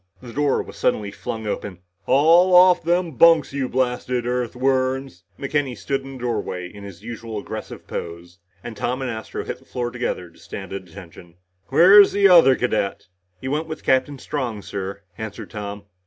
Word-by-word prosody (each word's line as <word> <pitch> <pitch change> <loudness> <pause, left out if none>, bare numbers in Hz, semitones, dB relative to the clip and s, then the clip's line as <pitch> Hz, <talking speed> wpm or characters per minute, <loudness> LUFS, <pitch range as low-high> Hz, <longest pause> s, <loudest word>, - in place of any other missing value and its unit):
The 120 -2 -11
door 145 -1 +1
was - - -12
suddenly 100 -1 0
flung 110 +2 -6
open. 100 -3 -4 0.3
"Haul 165 +7 +5
off 180 0 +7
them 175 +1 0
bunks, 160 +1 +5
you 135 -2 -2
blasted 125 -1 -1
Earthworms!" 130 -3 -1
McKenny 140 -3 -2
stood 135 +6 -2
in 135 0 -10
the - - -8
doorway 105 -7 -3
in 100 +2 -12
his 100 -1 -11
usual 115 -1 -6
aggressive 105 - -7
pose, 85 +1 -7 0.2
and 120 - -7
Tom 125 +5 -2
and 125 - -2
Astro 110 -1 -6
hit - - -5
the - - -23
floor 120 -1 -4
together 115 -8 -4
to - - -22
stand 95 -1 -8
at 95 -2 -7
attention. 85 -2 -13 0.3
"Where's 195 +8 +7
the 200 0 +5
other 170 -8 +7
cadet?" 110 -7 -2 0.3
"He 130 - -6
went 150 +4 -1
with 155 -1 -7
Captain 130 +2 +1
Strong, 125 -7 -4
sir," 100 0 -6 0.2
answered 110 -2 -7
Tom. 105 -1 -6
125 Hz, 175 wpm, -22 LUFS, 100-140 Hz, 0.3 s, off